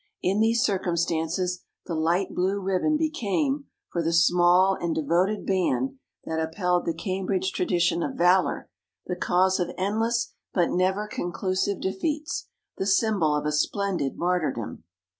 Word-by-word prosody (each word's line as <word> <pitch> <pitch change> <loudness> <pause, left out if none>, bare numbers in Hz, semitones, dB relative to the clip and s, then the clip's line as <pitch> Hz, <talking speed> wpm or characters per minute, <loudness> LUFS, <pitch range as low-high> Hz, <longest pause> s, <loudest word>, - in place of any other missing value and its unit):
In 195 +3 +1
these 230 +2 +3
cir 200 -6 +1
cumstances, 170 +1 -1 0.3
the 170 - -4
light 170 +4 0
blue 190 +3 0
ribbon 195 +11 +1
became, 290 - -1 0.3
for 170 - -1
the 165 0 0
small 175 +3 +5
and 170 -2 -1
devoted 175 +7 +1
band 255 +8 0 0.3
that 160 0 -2
upheld 180 +2 0
the 165 - +1
Cambridge 190 0 -1
tradition 175 -1 +1
of - - -3
valour, 180 +2 +3 0.4
the 180 - -3
cause 185 +2 +2
of 175 - 0
endless 225 +5 0 0.2
but 175 -3 +2
never 190 +3 +1
conclusive 185 +1 -2
defeats, 300 - -2 0.3
the 190 - -2
symbol 195 -6 +2
of 150 - -2
a 150 - +1
splendid 175 -1 -1
martyrdom. 155 - -2
185 Hz, 140 wpm, -26 LUFS, 170-200 Hz, 0.4 s, small